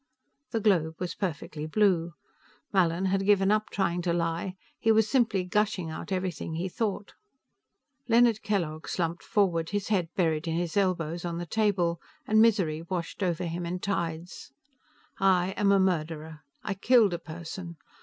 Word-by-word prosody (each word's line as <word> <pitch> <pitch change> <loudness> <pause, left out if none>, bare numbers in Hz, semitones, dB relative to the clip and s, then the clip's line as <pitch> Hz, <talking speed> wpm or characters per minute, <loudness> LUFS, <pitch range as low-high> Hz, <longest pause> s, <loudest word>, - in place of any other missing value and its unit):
The 230 - -1
globe 170 -7 +2
was 180 -2 -3
perfectly 155 -4 -4
blue. 175 -2 +2 0.6
Mallin 180 -1 +2
had 195 +1 +1
given 195 -1 +4
up 215 0 +1
trying 180 -3 0
to 170 -1 0
lie; 170 +2 -1 0.2
he 225 - +3
was 220 -1 +4
simply 220 -6 +2
gushing 185 -3 0
out 160 - -7
everything 185 -3 -2
he 175 +3 -2
thought. 205 0 -3 0.9
Leonard 235 -2 +4
Kellogg 165 -7 -2
slumped 170 0 -2
forward, 175 -7 +1
his 205 0 -2
head 185 -6 +1
buried 160 -3 +1
in 165 - -1
his 170 -1 -2
elbows 175 -4 0
on 170 -1 -3
the 175 - -4
table, 180 -4 +1 0.2
and 215 0 +4
misery 190 -9 +3
washed 170 +2 -5
over 180 -2 0
him 170 +1 -3
in 175 +1 -3
tides. 170 -5 -4 0.7
_I 190 -1 +3
am 200 -1 +3
a 200 - +5
murderer; 160 -4 -1 0.2
I 205 - -2
killed 215 0 +4
a 170 - -2
person. 170 +1 -8
180 Hz, 160 wpm, -28 LUFS, 165-200 Hz, 0.9 s, a